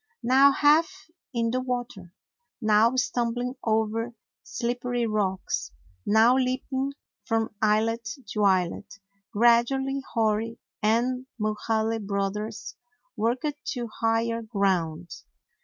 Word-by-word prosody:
Now 270 Hz, +3 st, +6 dB
half 305 Hz, +3 st, +2 dB, 0.2 s
in 230 Hz, -3 st, 0 dB
the 255 Hz, +1 st, 0 dB
water, 245 Hz, -8 st, -5 dB, 0.4 s
now 220 Hz, +1 st, +4 dB
stumbling 245 Hz, 0 st, -1 dB
over 225 Hz, +1 st, 0 dB, 0.3 s
slippery 245 Hz, 0 st, -2 dB
rocks, 205 Hz, -4 st, -1 dB, 0.4 s
now 225 Hz, +4 st, +5 dB
leap 255 Hz, 0 st, 0 dB
ing 270 Hz, +1 st, -1 dB, 0.3 s
from 225 Hz, -2 st, -1 dB
islet 220 Hz, +1 st, +1 dB, 0.2 s
to 210 Hz, -, -2 dB
islet, 185 Hz, 0 st, +1 dB, 0.4 s
gradually 240 Hz, +5 st, +3 dB
Hori 225 Hz, 0 st, +1 dB, 0.2 s
and 245 Hz, +4 st, +1 dB
Mulhaly 220 Hz, +1 st, 0 dB
Brothers 210 Hz, +2 st, -3 dB, 0.4 s
worked 260 Hz, +7 st, -1 dB
to 240 Hz, -3 st, -4 dB
higher 230 Hz, 0 st, +1 dB
ground. 180 Hz, -6 st, -1 dB
230 Hz, 100 wpm, -26 LUFS, 215-250 Hz, 0.4 s, Now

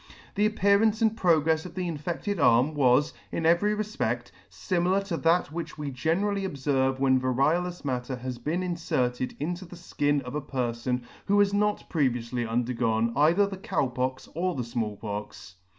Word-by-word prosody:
The 210 Hz, +1 st, +3 dB
appearance 215 Hz, +1 st, +3 dB
and 220 Hz, 0 st, +3 dB
progrefs 160 Hz, -5 st, +2 dB
of 175 Hz, -1 st, -10 dB
the 185 Hz, -1 st, -2 dB
infeffced 170 Hz, +5 st, -3 dB
arm 125 Hz, +4 st, +4 dB
was, 140 Hz, 0 st, +3 dB, 0.2 s
in 165 Hz, -, -2 dB
every 175 Hz, +6 st, +3 dB
refpedt, 215 Hz, +1 st, -2 dB, 0.2 s
fimilar 185 Hz, +1 st, 0 dB
to 175 Hz, -4 st, -2 dB
that 165 Hz, -1 st, +2 dB
which 170 Hz, 0 st, -6 dB
we 145 Hz, -2 st, -4 dB
generally 190 Hz, +10 st, 0 dB
obferve 135 Hz, -6 st, 0 dB
when 130 Hz, -1 st, +3 dB
variolous 155 Hz, +8 st, 0 dB
matter 130 Hz, -1 st, -2 dB
has 125 Hz, 0 st, -6 dB
been 160 Hz, +9 st, -2 dB
inferted 130 Hz, -8 st, -1 dB
into 175 Hz, +5 st, -3 dB
the 175 Hz, 0 st, -11 dB
fkin 145 Hz, -4 st, -1 dB
of 125 Hz, +1 st, -7 dB
a 150 Hz, -, -2 dB
perfon 125 Hz, -2 st, -2 dB, 0.2 s
who 200 Hz, +1 st, +3 dB
has 200 Hz, -1 st, +4 dB
not 210 Hz, 0 st, 0 dB
previoufly 120 Hz, -5 st, -1 dB
undergone 115 Hz, -1 st, 0 dB
either 165 Hz, +8 st, +4 dB
the 195 Hz, -1 st, -6 dB
Cow 185 Hz, -, -1 dB
Pox 130 Hz, +1 st, -3 dB
or 180 Hz, +2 st, -1 dB
the 125 Hz, -, -2 dB
Small 115 Hz, -3 st, -3 dB
Pox. 100 Hz, -2 st, -7 dB
150 Hz, 165 wpm, -27 LUFS, 125-180 Hz, 0.2 s, arm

